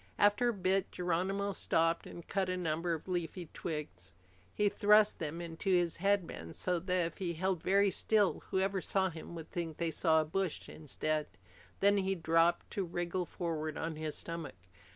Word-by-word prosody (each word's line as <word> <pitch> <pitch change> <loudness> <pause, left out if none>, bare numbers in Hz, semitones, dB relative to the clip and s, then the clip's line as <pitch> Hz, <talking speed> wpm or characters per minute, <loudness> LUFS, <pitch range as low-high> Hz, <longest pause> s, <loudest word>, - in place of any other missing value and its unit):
After 205 +4 +4
a - - +1
bit 190 0 +1
Geronimo 190 +3 -1
stopped 165 -1 +1
and 170 - -10
cut 195 -2 0
a 185 - -1
number 165 0 0
of 160 - -10
leafy 175 -1 -3
twigs. 95 - -5 0.4
He 210 - +3
thrust 210 +1 +4
them 165 +1 -3
into 170 +3 -4
his 175 -3 +2
headband 180 - -1
so 180 -1 0
that, 180 0 +1
if 165 - -5
he 175 -3 -1
held 185 +1 -1
very 200 +1 +3
still, 210 -2 +2
whoever 190 0 +1
saw 190 -1 +1
him 165 +1 -9
would 160 -1 -8
think 165 -3 -4
they 170 -1 -1
saw 160 -1 +3
a 155 - +1
bush 185 +2 -2
instead. 155 0 -2 0.5
Then 200 +1 +5
he 195 0 0
dropped 165 0 +2
to 200 - -1
wriggle 175 0 -2
forward 160 -3 -3
on 160 0 -3
his 155 -1 -4
stomach. 165 - -5
175 Hz, 175 wpm, -33 LUFS, 160-190 Hz, 0.5 s, Then